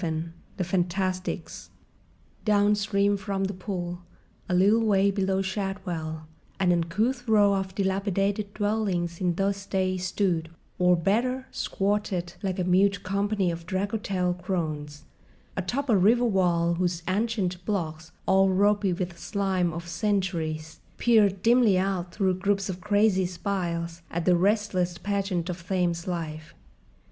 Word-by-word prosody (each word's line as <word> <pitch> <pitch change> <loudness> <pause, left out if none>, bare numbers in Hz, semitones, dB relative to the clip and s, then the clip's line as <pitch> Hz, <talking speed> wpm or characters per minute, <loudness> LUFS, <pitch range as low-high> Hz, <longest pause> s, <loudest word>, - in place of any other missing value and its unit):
VII 160 -1 -2 0.3
THE 185 - 0
FANTASTICS 185 +1 -2 0.7
Downstream 205 -1 +2
from 195 0 -2
The 195 +1 -1
Pool, 180 -2 -5 0.5
a 180 - +2
little 205 +5 +4
way 200 -2 +3
below 195 -1 0
Shadwell, 185 -5 -4 0.3
an 185 -2 +3
uncouth 215 +10 0
row 205 -2 +5
of 190 -1 -2
dilapidated 200 +1 0
dwellings 200 -5 -1
in 175 -2 +1
those 195 +1 -1
days 185 -1 0
stood—or, 180 -1 0
better, 245 +9 0
squatted, 195 -3 -1
like 190 -2 -2
a 185 - 0
mute 190 +2 +3
company 200 -1 0
of 165 0 -7
draggletail 190 -2 -1
crones—atop 170 - -5
a 230 - +4
river 225 +6 +4
wall 175 -5 +2
whose 175 -1 -1
ancient 190 -3 -1
blocks, 160 -5 -3
all 190 0 +4
ropy 200 0 +3
with 180 0 -3
the 170 - -17
slime 190 -1 0
of 170 +1 -6
centuries, 170 -6 -2 0.2
peered 205 -5 +3
dimly 230 -4 +5
out 185 -2 -1
through 190 -1 +1
groups 195 0 0
of 180 -1 -5
crazy 205 -2 +3
spiles 170 -2 -3
at 170 0 -3
the 180 - +5
restless 185 -2 +1
pageant 195 -4 -1
of 175 -1 -6
Thames 175 -2 0
life. 155 -3 -5
190 Hz, 130 wpm, -27 LUFS, 175-200 Hz, 0.7 s, row